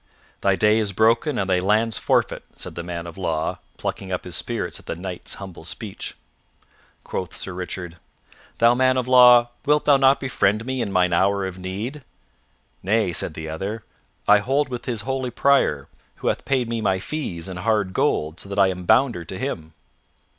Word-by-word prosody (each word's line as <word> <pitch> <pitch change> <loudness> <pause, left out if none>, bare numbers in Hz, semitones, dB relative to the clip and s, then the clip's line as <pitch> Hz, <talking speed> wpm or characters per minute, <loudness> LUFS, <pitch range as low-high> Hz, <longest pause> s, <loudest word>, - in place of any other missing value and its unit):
"Thy 100 -1 +3
day 105 +2 +3
is 105 -2 0
broken 115 - +2
and 95 - 0
thy 90 -1 +2
lands 110 +3 +1
forfeit," - - +1
said - - -7
the 85 - -5
man 85 0 -5
of 85 +2 -9
law, 80 -4 -1 0.2
plucking 95 -1 -4
up 90 - -2
his 90 -2 -6
spirits - - -3
at - - -19
the - - -3
Knight's 90 +1 -5
humble 95 -4 -9
speech. 100 +4 -6 0.9
Quoth 90 - -5
Sir 95 - -5
Richard, 90 -1 -6 0.6
"Thou 115 +1 +5
man 130 +1 +3
of 125 -1 -1
law, 125 -1 +7
wilt 150 +1 +2
thou 145 -2 +6
not 135 0 +4
befriend 110 -5 +1
me 130 -1 -2
in 100 - -2
mine 90 -1 +2
hour 100 +2 +2
of 95 -1 -6
need?" 105 +11 -5 0.8
"Nay," 105 -1 +1
said 80 -1 0
the 80 0 -6
other, 100 +8 -4 0.4
"I 105 0 +7
hold 135 +6 0
with 125 -2 -4
this 115 -4 -2
holy 130 +2 -2
Prior, 125 - +2 0.3
who - - -1
hath - - -2
paid 130 -3 +1
me 115 -1 -2
my 95 -3 +2
fees 95 - -5
in 95 -1 -6
hard 105 -1 0
gold, 80 -1 0
so 100 - -9
that 100 - -5
I 100 -1 +5
am 90 -1 -5
bounder 120 -5 +3
to 95 - -6
him." 85 - -4
100 Hz, 190 wpm, -23 LUFS, 90-125 Hz, 0.9 s, law